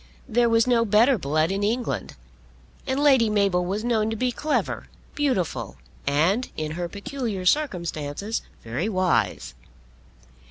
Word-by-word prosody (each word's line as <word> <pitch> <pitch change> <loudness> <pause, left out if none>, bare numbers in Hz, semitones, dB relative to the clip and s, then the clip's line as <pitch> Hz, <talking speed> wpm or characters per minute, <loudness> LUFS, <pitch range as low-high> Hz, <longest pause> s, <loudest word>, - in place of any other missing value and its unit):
There 240 +1 +3
was 230 0 +4
no 240 -2 +3
better 230 +3 +4
blood 155 +3 +1
in 195 +1 -1
England. 230 +4 -2 0.7
And 265 +1 0
Lady 265 -6 +5
Mabel 200 -4 +2
was 195 +4 -2
known 225 -3 +1
to 225 - -2
be 250 +3 0
clever, 300 +5 -2 0.3
beautiful, 215 - -1 0.3
and, 170 - +2
in 155 -1 -3
her 170 +2 -4
peculiar 200 -1 -4
circumstances, 180 - -1 0.2
very 125 - -2
wise. 180 - 0
210 Hz, 130 wpm, -24 LUFS, 175-240 Hz, 0.7 s, Lady